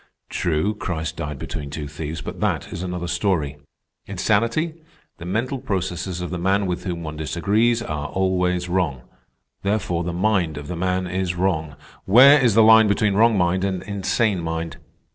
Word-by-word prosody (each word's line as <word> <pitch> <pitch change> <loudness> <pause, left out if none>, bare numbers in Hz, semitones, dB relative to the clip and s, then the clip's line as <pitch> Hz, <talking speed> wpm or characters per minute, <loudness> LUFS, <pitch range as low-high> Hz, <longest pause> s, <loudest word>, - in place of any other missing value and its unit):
True, 85 +5 0
Christ 80 -7 -4
died 75 -1 -4
between 75 +1 -6
two 75 0 -5
thieves, 75 +2 -6
but - - -7
that - - -1
is - - -5
another 90 -1 -4
story. 80 -7 0 0.5
Insanity? 115 +10 0 0.4
The 85 - -8
mental 120 +8 -1
processes 95 -3 -3
of 90 - -5
the 90 - -3
man 95 +3 +1
with 90 -2 -3
whom 85 -2 -3
one 75 -1 -6
disagrees, 105 +9 +1
are 75 -6 -4
always 90 -1 0
wrong. 85 -8 -1 0.6
Therefore 100 -4 -1
the 85 - -3
mind 90 -4 0
of 75 -1 -7
the 90 - -4
man 90 +1 -1
is 90 0 -2
wrong. 80 -5 -1 0.3
Where 135 +8 +8
is 115 -5 +3
the 110 - +7
line 110 0 +7
between 100 0 +2
wrong 110 +1 +4
mind 90 +1 +1
and 95 -2 -2
insane 100 0 0
mind? 80 0 -4
90 Hz, 170 wpm, -22 LUFS, 85-105 Hz, 0.6 s, Where